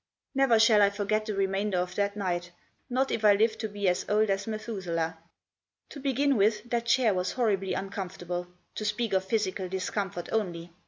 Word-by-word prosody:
Never 270 -4 +4
shall 220 -1 +6
I 200 - +6
forget 210 +2 -1
the 210 - -2
remainder 195 0 0
of 180 0 -1
that 200 +2 -1
night, 175 -3 -2 0.4
not 260 +2 +1
if 220 - -2
I 210 -1 +7
live 220 +1 +2
to 220 - -2
be 205 -1 -2
as 180 - +2
old 210 0 +3
as 195 +2 -1
Methuselah. 185 -7 -3 0.7
To 285 - -9
begin 275 0 +1
with, 210 +2 +2
that 235 -1 0
chair 235 -2 +4
was 180 0 -1
horribly 200 -6 0
uncomfortable, 180 -2 -4 0.3
to - - -5
speak 210 +1 -1
of 190 0 +2
physical 190 -3 -1
discomfort 190 -1 -3
only. 175 -6 -2
205 Hz, 180 wpm, -28 LUFS, 185-220 Hz, 0.7 s, I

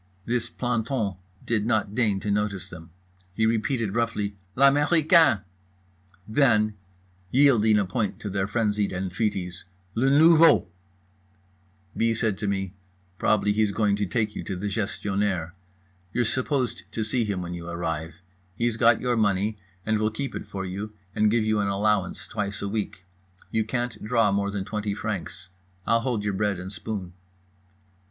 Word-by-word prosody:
This 120 0 -1
planton 115 -5 -1 0.3
did 110 -3 +1
not 110 -3 +1
deign 105 -4 +1
to 105 - -1
notice 105 -2 -1
them. 80 -1 -10 0.5
He 110 - +2
repeated 115 -1 0
roughly 110 -3 -1 0.2
"L'américain." 145 - +5 0.8
Then, 110 -3 +3 0.6
yielding 120 -4 +5
a 100 - +2
point 105 +2 -2
to 105 - -4
their 95 0 0
frenzied 105 -2 0
entreaties: 95 -1 -2 0.3
"Le 125 +5 +2
nouveau." 155 - +6 1.3
B. 115 0 +2
said 110 -3 -1
to 105 - -2
me 95 -2 -2 0.5
"Probably 105 -1 +2
he's 110 0 +2
going 105 -1 +2
to 100 -1 -1
take 110 +2 -1
you - - -4
to 95 - -3
the 90 +3 -5
Gestionnaire. 100 -4 -1 0.6
You're 120 +3 +1
supposed 130 0 -2
to 110 - -1
see 115 +3 0
him 100 -4 -2
when 90 0 -5
you 85 0 -6
arrive. 80 -1 -3 0.4
He's 115 +1 0
got - - +4
your 125 -1 +1
money 105 -1 +1 0.3
and 110 0 +1
will 110 0 +2
keep 135 +5 -4
it - - -6
for 95 -2 -5
you, 100 +4 -5 0.2
and 105 +1 +3
give 115 +1 +2
you 110 0 +1
an 100 - +1
allowance 100 -3 0
twice 100 -1 -4
a - - -1
week. 100 -3 -3 0.5
You 110 - +1
can't 120 0 -3
draw 115 -2 +2
more 100 0 0
than 100 -1 -3
20 105 -1 -3
francs. 95 -3 -5 0.4
I'll 115 - +3
hold 115 -3 -1
your 105 -1 -1
bread 100 -1 0
and 95 +2 -7
spoon." 95 -1 -5
105 Hz, 160 wpm, -26 LUFS, 100-115 Hz, 1.3 s, nouveau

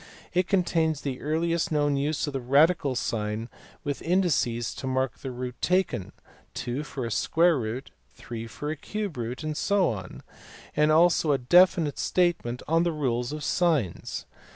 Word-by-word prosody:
It 180 0 +2
contains 165 -5 +1
the 135 -3 -4
earliest 165 +3 0
known 145 -2 +2
use 145 +2 0
of 145 - -5
the 135 - -2
radical 140 +2 +3
sign 110 0 -2 0.3
with 145 -1 -3
indices 160 -10 +1
to 130 - -6
mark 130 -2 -1
the 135 - -5
root 125 0 -6
taken, 180 - 0 0.4
2 125 +4 -3
for 140 -4 -5
a 115 - -4
square 165 +5 +3
root, 120 +4 -5 0.2
3 115 -1 -7
for 145 +7 -5
a - - -2
cube 205 +3 -4
root, 120 +5 -4
and 155 -1 -3
so 200 +1 +2
on; 95 -4 -7 0.5
and 150 0 +4
also 165 -1 +4
a - - +3
definite 170 +2 +4
statement 170 -9 0
of 165 +2 +3
the 170 - +1
rule 130 -6 0
of 150 0 -5
signs. 150 - 0
145 Hz, 165 wpm, -27 LUFS, 125-170 Hz, 0.5 s, and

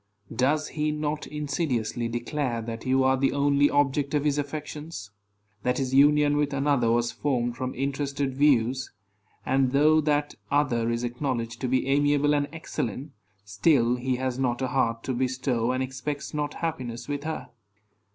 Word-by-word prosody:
Does 145 +5 +1
he 150 0 -1
not 150 0 -3
insidiously 140 -6 -2
declare 120 +1 -2
that 115 +2 -6
you 130 +1 +3
are 130 0 +4
the 135 0 +1
only 145 0 +3
object 145 0 +1
of 145 - +1
his 145 -1 +2
affections; 150 -5 -6 0.5
that 125 +3 0
his 130 -1 -2
union 145 +1 +5
with 145 -1 0
another 135 -4 +2
was 120 0 +2
formed 120 -4 -1
from 130 0 -4
interested 140 0 -2
views; 130 -2 +2 0.5
and, 135 0 +2
though 155 +3 +5
that 145 -1 0 0.2
other 125 -5 +1
is 115 +1 -1
acknowledged 120 -2 -3
to 130 - 0
be 130 +1 +1
amiable 145 +1 +3
and 145 -1 +1
excellent, 140 -4 -4 0.3
still 115 +4 +3
he 125 +1 -1
has 130 0 -2
not 125 -2 0
a 130 - 0
heart 115 -3 0
to 130 - -2
bestow, 125 -1 0
and 130 +1 0
expects 135 +3 -5
not 150 -1 -2
happiness 125 -8 -4
with 145 -1 -3
her? 160 +1 -4
135 Hz, 160 wpm, -26 LUFS, 125-145 Hz, 0.5 s, union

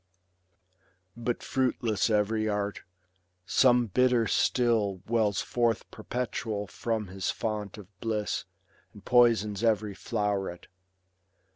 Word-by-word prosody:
But 120 0 -3
fruitless 120 -6 0
every 110 0 +1
art; 105 -1 -2 0.6
some 125 +5 +4
bitter 125 +2 +3
still 110 -6 +1
Wells 110 -4 +1
forth 120 -2 0
perpetual 110 -2 -3
from 110 0 -3
his 95 +1 -3
fount 105 -2 -3
of 105 - -10
bliss, 110 -1 -2 0.5
And - - -15
poisons 115 -4 +3
every 110 -2 +1
floVret. 100 -4 -2
110 Hz, 100 wpm, -28 LUFS, 105-120 Hz, 0.6 s, some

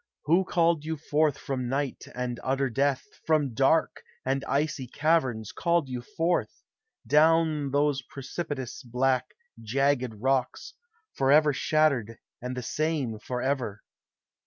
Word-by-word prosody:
Who 175 +5 +3
called 170 -4 +2
you 160 +1 -3
forth 150 -1 +1
from 130 -3 -3
night 140 0 -2
and 125 -1 -3
utter 135 0 0
death, 135 +2 +1 0.2
From 150 -5 +2
dark 135 +7 +2 0.2
and 135 +1 0
icy 145 -2 -1
caverns 130 -7 0
called 170 -4 +1
yon 125 -1 -4
forth, 165 +7 -1 0.4
Down 155 -1 +3
those 145 0 +1
precipitous, 135 0 -6
black, 130 +1 0 0.3
jagged 125 0 0
rocks, 130 +3 -1 0.4
Forever 145 +2 +4
shattered 135 -7 +1 0.2
and 125 +1 -5
the 125 - -3
same 145 -5 -1
forever? 125 -2 -2
135 Hz, 120 wpm, -27 LUFS, 125-155 Hz, 0.4 s, Forever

